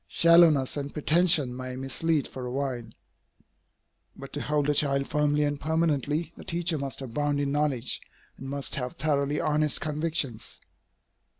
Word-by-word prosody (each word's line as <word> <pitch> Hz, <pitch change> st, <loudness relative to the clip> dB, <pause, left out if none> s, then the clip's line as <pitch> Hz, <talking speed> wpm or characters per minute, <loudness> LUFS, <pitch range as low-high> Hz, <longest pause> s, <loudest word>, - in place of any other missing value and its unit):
Shallowness 165 Hz, -6 st, +5 dB
and 140 Hz, 0 st, -4 dB
pretension 155 Hz, -4 st, +3 dB
may 130 Hz, 0 st, -6 dB
mislead 140 Hz, +4 st, 0 dB
for 125 Hz, -1 st, -7 dB
a -, -, -5 dB
while. 130 Hz, -3 st, -3 dB, 1.3 s
But 135 Hz, -, -11 dB
to 145 Hz, -, -3 dB
hold 150 Hz, -1 st, 0 dB
a 150 Hz, -, +3 dB
child 140 Hz, -1 st, +3 dB
firmly 150 Hz, 0 st, +1 dB
and 145 Hz, -1 st, -2 dB
permanently, 160 Hz, 0 st, 0 dB
the -, -, -11 dB
teacher 170 Hz, -2 st, -1 dB
must 135 Hz, 0 st, -4 dB
abound 145 Hz, +3 st, -1 dB
in 140 Hz, -1 st, -1 dB
knowledge, 140 Hz, -4 st, 0 dB, 0.3 s
and 135 Hz, -, -8 dB
must 140 Hz, 0 st, -2 dB
have 125 Hz, -3 st, -3 dB
thoroughly 145 Hz, 0 st, 0 dB
honest 150 Hz, 0 st, +1 dB
convictions. 150 Hz, -6 st, -2 dB
145 Hz, 145 wpm, -27 LUFS, 135-155 Hz, 1.3 s, Shallowness